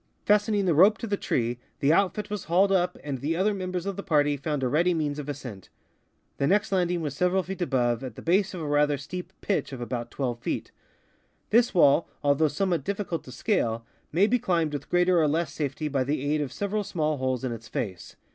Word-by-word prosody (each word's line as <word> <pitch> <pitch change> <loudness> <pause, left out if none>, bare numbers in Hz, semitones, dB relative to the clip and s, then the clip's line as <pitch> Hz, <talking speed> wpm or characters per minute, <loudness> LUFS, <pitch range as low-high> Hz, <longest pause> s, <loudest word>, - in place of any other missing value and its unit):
Fastening 210 -1 +3
the 175 - +3
rope 195 +8 +6
to - - -5
the 205 -2 0
tree, 120 -9 -1 0.2
the 140 +3 +3
outfit 200 +3 +1
was 210 -3 -4
hauled 185 +5 +3
up, 180 -2 +1
and 140 -3 -4
the 150 +6 -1
other 200 +4 +2
members 185 -2 -3
of 200 -2 -3
the - - -3
party 145 -6 +2
found 145 0 -3
a - - +2
ready 170 +7 +2
means 150 -2 -1
of 145 0 -6
ascent. 125 -9 -7 0.7
The 140 - +2
next 205 +5 +2
landing 180 -2 +1
was 145 -3 -3
several 180 +3 +2
feet 190 +1 -6
above, 120 -7 +1
at 125 -5 -6
the - - -10
base 190 +3 +2
of 175 - -5
a 155 - -3
rather 145 0 +2
steep 180 +6 -7
pitch 200 - -1
of 130 - -6
about 120 0 -4
twelve 120 -2 -3
feet. - - -3 0.8
This 235 0 +4
wall, 160 -1 +5
although 145 +2 +3
somewhat 170 +1 0
difiicult 195 -2 -3
to 130 - -10
scale, 115 - -1 0.3
may 180 +6 +4
be 245 +3 +2
climbed 165 -7 0
with 145 -1 -5
greater 180 -1 +3
or 155 - +3
less 155 0 0
safety 150 0 -3
by 135 -3 0
the 140 +1 -2
aid 155 - +1
of 140 -4 -3
several 205 +7 -2
small 155 -6 -1
holes 130 -2 -1
in 130 - -1
its 115 -1 -7
face. 95 -6 -5
160 Hz, 220 wpm, -27 LUFS, 140-190 Hz, 0.8 s, rope